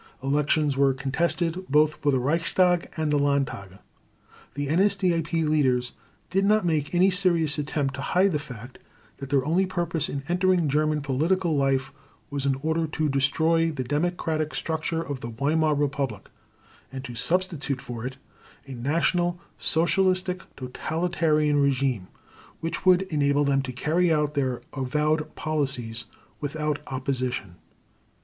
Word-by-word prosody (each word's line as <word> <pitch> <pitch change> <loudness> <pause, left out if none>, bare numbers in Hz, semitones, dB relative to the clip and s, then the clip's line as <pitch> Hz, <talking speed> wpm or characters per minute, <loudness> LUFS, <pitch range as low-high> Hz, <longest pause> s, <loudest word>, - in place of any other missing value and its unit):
Elections 145 +1 +1
were 135 -1 +3
contested 165 +6 -1
both 150 +2 +4
for 145 -1 +1
the 130 - +2
Reichstag 170 +6 +2
and 155 -2 0
the 145 - +3
Landtage. 140 -9 -1 0.8
The 145 0 -2
NSDAP 170 -2 +1
leaders 130 -5 +2 0.4
did 195 +2 +2
not 210 0 +3
make 155 -1 0
any 185 +2 +5
serious 170 -5 +1
attempt 145 -2 -1
to 140 - -5
hide 185 +6 +2
the 150 - 0
fact 125 -4 -10 0.4
that 135 - -7
their 140 -2 +2
only 180 +5 +2
purpose 170 -4 -2
in 140 -1 -4
entering 180 -1 +2
German 150 +1 +1
political 160 +5 +1
life 135 -1 +1 0.4
was 140 -1 -2
in 135 - +2
order 160 +1 0
to 155 0 -1
destroy 160 +5 +2
the 145 -5 -3
democratic 155 +2 -1
structure 160 0 -2
of 140 -4 -5
the 115 - -6
Weimar 150 +6 +1
Republic, 140 -6 -2 0.6
and 135 0 -6
to 120 - -7
substitute 150 +1 -1
for 120 -3 -7
it 130 +1 -5 0.5
a 135 - -10
National 170 +7 0 0.2
Socialist 185 +3 +2 0.3
totalitarian 155 +2 0
regime 135 -8 +1 0.5
which 165 +3 -4
would 185 0 +6
enable 145 0 +2
them 140 -1 +2
to 130 -1 -5
carry 165 +7 +1
out 150 -1 +1
their 130 -4 -1
avowed 150 +3 -1
policies 135 -7 -2 0.3
without 150 0 -2
opposition. 130 -8 -3
150 Hz, 140 wpm, -26 LUFS, 135-165 Hz, 0.8 s, would